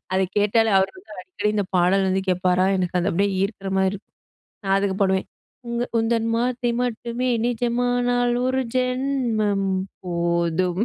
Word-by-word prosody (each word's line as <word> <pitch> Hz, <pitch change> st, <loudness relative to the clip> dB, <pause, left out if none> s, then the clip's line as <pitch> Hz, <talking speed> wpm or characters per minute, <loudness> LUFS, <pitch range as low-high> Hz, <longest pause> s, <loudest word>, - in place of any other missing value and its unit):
அதை 190 Hz, 0 st, +2 dB
கேட்டாலே 220 Hz, +2 st, +3 dB
அவர் 190 Hz, 0 st, +1 dB
வந்து 205 Hz, +3 st, -17 dB
அடிக்கடி 205 Hz, +3 st, -2 dB
இந்த 205 Hz, -, +1 dB
பாடல் 190 Hz, +2 st, +3 dB
வந்து 190 Hz, +1 st, +1 dB
கேட்பாரா, 180 Hz, 0 st, +2 dB
எனக்கு 180 Hz, -1 st, -1 dB
அது 175 Hz, -, 0 dB
அப்படியே 200 Hz, +3 st, +1 dB
ஈர்க்கிற 195 Hz, -1 st, -3 dB
மாரி 190 Hz, 0 st, +3 dB
இருக்கும். 200 Hz, -, -10 dB, 0.5 s
நா -, -, -3 dB
அதுக்கு 195 Hz, -1 st, 0 dB
பாடுவேன், 190 Hz, -1 st, +1 dB, 0.4 s
"உங்க 235 Hz, 0 st, -1 dB, 0.2 s
உந்தன் 225 Hz, 0 st, 0 dB
வார்த்தை 245 Hz, 0 st, 0 dB
மட்டுமே 240 Hz, +1 st, -2 dB, 0.2 s
நிஜமானால், 245 Hz, 0 st, +1 dB
ஒரு 260 Hz, 0 st, +1 dB
ஜென்மம் 250 Hz, -6 st, 0 dB, 0.4 s
போதும்." 170 Hz, +1 st, 0 dB
205 Hz, 145 wpm, -23 LUFS, 190-240 Hz, 0.5 s, கேட்டாலே